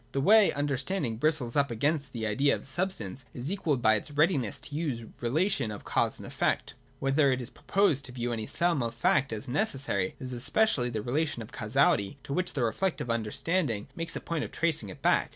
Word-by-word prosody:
The 140 - 0
way 210 +8 +6
understanding 140 - -1
bristles 145 -3 0
up 140 -1 +3
against 140 +5 0
the 115 -2 -4
idea 135 +7 +2
of - - -9
substance 135 - -3
is 130 +6 -3
equalled 155 -10 -1
by 110 - +6
its 105 - -2
readiness 145 - +1
to 145 - -6
use 145 -7 -2
the 115 - -11 0.2
re 155 +9 +2
lation 155 - 0
of 105 - -7
cause - - 0
and - - -7
effect. - - -1 0.3
Whenever 135 +1 +3
it 130 - 0
is 125 -1 -6
proposed 175 -8 +1
to 125 - -6
view 120 -1 -3
any 110 -2 -4
sum 170 -4 +1
of 115 -1 -3
fact 135 +3 +2
as 110 -1 -5
necessary, 135 - 0
it - - -8
is 130 0 -5
especially 130 - +2
the 110 -3 -3
relation 145 0 -1
of 110 - -13
causality 105 -1 +1
to 140 - -5
which 180 +3 -1
the 130 - 0
reflective 125 +2 -1
understand 120 - 0
ing 105 -2 -4
makes 165 -1 -2
a - - -4
point 165 -3 -2
of - - -6
tracing 155 -11 0
it 95 - -11
back. - - +3
135 Hz, 220 wpm, -29 LUFS, 115-160 Hz, 0.3 s, way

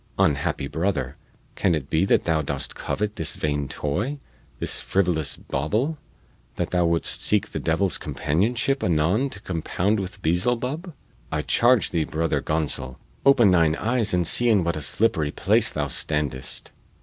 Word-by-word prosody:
Unhappy 70 -2 +1
brother, 90 +7 -2 0.4
can 90 -3 +1
it 70 -3 -4
be 80 +5 +1
that - - +3
thou 80 -2 +1
dost 70 -1 -4
covet 105 0 -3
this 80 - -2
vain 75 -2 -1
toy, 105 - -2 0.4
this - - -2
frivolous 85 -6 0
bauble, 110 - -2 0.6
that - - -3
thou 90 -2 +2
wouldst 85 0 +1
seek - - +3
the - - -4
devil's 85 +4 +1
companionship 115 - 0
anon 90 - +2
to 100 - -10
compound 95 +4 -1
with 95 0 -6
Beelzelub? 125 - -1 0.4
I 75 -1 -1
charge 120 +3 +3
thee, 80 -3 0
Brother 80 +2 -1
Gonsol, 75 -5 -2 0.3
open 120 -8 +6
thine 80 -3 +3
eyes 115 +1 +1
and 90 -1 +2
see 120 +8 +4
in 105 -5 +4
what 85 0 -1
a 75 - -4
slippery 80 0 +1
place - - +2
thou - - -2
standest." 70 -4 -2
85 Hz, 155 wpm, -24 LUFS, 75-110 Hz, 0.6 s, open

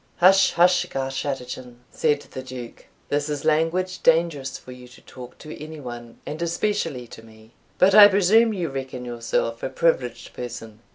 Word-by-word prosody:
"Hush! 190 +2 +5
hush! 180 +1 +4
Garschattachin," 135 -2 -4 0.2
said 150 -2 +1
the 130 - -9
Duke; 130 -2 -10 0.2
"this 145 +1 -1
is 145 0 -4
language 165 +4 0
dangerous 160 -5 +1
for 130 - -13
you 125 0 -12
to 125 - -17
talk 125 -1 -12
to 155 -1 -10
any 155 0 -9
one, 120 -3 -9
and 155 +2 -6
especially 170 -6 -2
to 115 - -12
me; 110 0 -18 0.3
but 190 +1 +5
I 210 0 +11
presume 205 +4 +4
you 180 -6 -3
reckon 130 -2 -6
yourself 115 -1 -2
a - - -3
privileged 125 -9 -1
person. 115 -3 -8
140 Hz, 165 wpm, -23 LUFS, 125-170 Hz, 0.3 s, I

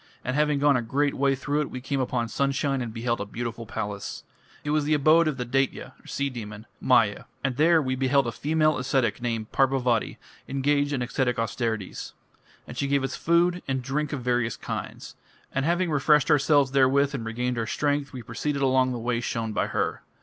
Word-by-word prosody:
And 130 - -1
having 150 -1 +2
gone 145 0 +4
a 125 - +1
great 140 +5 0
way 135 0 +2
through 145 +3 -1
it, 150 - -3
we 130 - -6
came 135 +2 -2
upon 125 -2 -1
sunshine 140 +2 0
and 120 -2 -4
beheld 115 0 -2
a - - -3
beautiful 115 +1 -5
palace. 105 -2 -5 0.4
It 145 - -2
was 150 0 +2
the 150 +1 +2
abode 155 +3 +5
of 150 -4 -1
the 125 - -3
Daitya 130 +1 -1
(sea 140 0 -1
demon) 110 -4 -7
Maya. 115 -5 +3 0.2
And 135 -2 0
there 165 +4 +5
we 130 -1 -1
beheld 135 +1 +2
a 115 - -2
female 155 +4 +1
ascetic 130 -1 0
named 115 -3 -3
Parbhàvati 130 -4 +1 0.3
engaged 145 +1 +1
in 130 -4 -1
ascetic 125 0 0
austerities. 115 -3 -3 0.5
And 120 - -8
she 140 +2 -1
gave 140 -1 +1
us 135 - -2
food 175 +2 +2
and 130 -1 -1
drink 145 +3 -2
of 140 -5 -4
various 120 -2 0
kinds. - - -6 0.4
And 135 +1 0
having 175 +1 +1
refreshed 150 +1 +3
ourselves 145 -2 +4
therewith 140 +1 +3
and 130 -4 -3
regained 120 +2 -2
our 115 - -2
strength, 145 +1 -1
we 125 -3 -7
proceeded 140 +5 -2
along 130 -1 +3
the - - -3
way 120 0 -1
shown 115 -2 -3
by - - 0
her. - - -2
135 Hz, 200 wpm, -26 LUFS, 120-145 Hz, 0.5 s, abode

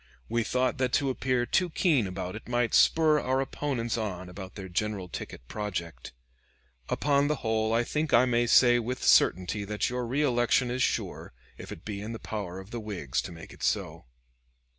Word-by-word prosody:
We 115 0 0
thought 130 +3 0
that 130 -1 0
to 140 -3 +2
appear 125 -1 0
too 180 +7 +1
keen 155 - +2
about 95 +1 -5
it 110 - -9
might 120 -1 0
spur 155 -2 +5
our 130 -1 0
opponents 130 -4 -2
on 95 -4 -4
about 95 0 -9
their 95 -2 -7
general 100 +1 -2
ticket - - -8
project. 85 - -5 0.8
Upon 145 -1 +2
the 150 - +1
whole 110 0 +1
I 115 +1 +2
think 150 +4 -2
I 120 +2 +6
may 120 -1 +2
say 120 0 +6
with 125 +2 -4
certainty 95 +3 +3
that 105 +3 -2
your 125 -1 -2
reelection 125 -2 +2
is 125 +1 -2
sure, - - -2 0.2
if - - -10
it 80 - -9
be 100 -2 -5
in 110 +3 -5
the - - -5
power 95 -4 -5
of 95 +3 -12
the 120 - -4
Whigs 100 - -3
to - - -8
make 80 -1 -11
it - - -16
so. - - -1
115 Hz, 190 wpm, -28 LUFS, 100-130 Hz, 0.8 s, I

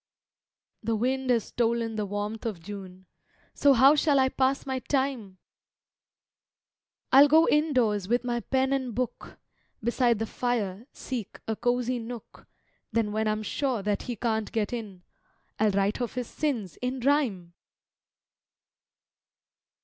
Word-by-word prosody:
The 225 +1 -1
wind 260 +3 -1
has 235 -3 +3
stolen 230 -1 -1
the 210 -1 -2
warmth 205 +2 -4
of 205 -6 -4
June, 190 0 -9 0.5
So 285 -1 +5
how 265 +3 +7
shall 295 -1 +3
I 265 -1 +4
pass 265 +1 0
my 265 -1 -2
time? 260 -8 -2 1.7
I'll 275 +2 +8
go 320 +3 +5
indoors 250 - +2
with 240 +3 +1
my 240 -1 -1
pen 265 +2 0
and 260 -5 -2
book, 250 0 -4 0.5
Beside 240 0 +2
the 225 - -2
fire 225 -3 -2
seek 245 -6 -6
a 220 - -1
cosy 245 +1 0
nook, 230 -1 -9 0.4
Then 225 -2 0
when 220 +1 0
I'm 215 0 -1
sure 250 -1 -1
that 205 0 0
he 245 - -4
can't 220 -1 -1
get 220 -1 -1
in, 205 -6 -6 0.6
I'll 215 0 +4
write 200 +4 0
of 240 - -3
his 250 -1 -2
sins 235 - -3
in 250 +1 -3
rhyme! 235 - +1
235 Hz, 140 wpm, -27 LUFS, 210-260 Hz, 1.7 s, I'll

